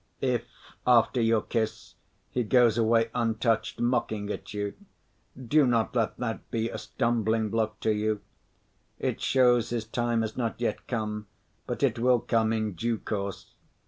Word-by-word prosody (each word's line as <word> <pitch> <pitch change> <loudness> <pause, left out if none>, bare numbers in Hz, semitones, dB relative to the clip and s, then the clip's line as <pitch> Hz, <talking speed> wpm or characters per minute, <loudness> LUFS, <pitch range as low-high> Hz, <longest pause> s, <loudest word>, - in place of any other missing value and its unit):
If, 125 -3 +1 0.4
after 120 0 +4
your 115 -1 +3
kiss, 110 -2 -3 0.4
he 125 - 0
goes 120 0 +4
away 115 0 +3
untouched, 115 -1 0
mocking 120 -4 0
at - - -6
you, 105 0 -3 0.7
do 135 +3 +3
not 115 0 +1
let 115 -3 0
that 115 -4 -4
be 115 0 -1
a - - -5
stumbling‐block 110 -1 0
to 110 - +2
you. 105 0 0 0.8
It - - -2
shows 125 -3 +3
his 115 -2 -2
time 120 0 0
has 110 -1 -3
not 115 -3 -2
yet 120 - -2
come, 105 -3 -3 0.4
but - - -3
it 120 -4 +2
will 125 0 +4
come 110 -1 +1
in 110 -2 -1
due 115 +7 -1
course. 100 -2 -5
115 Hz, 150 wpm, -28 LUFS, 110-120 Hz, 0.8 s, after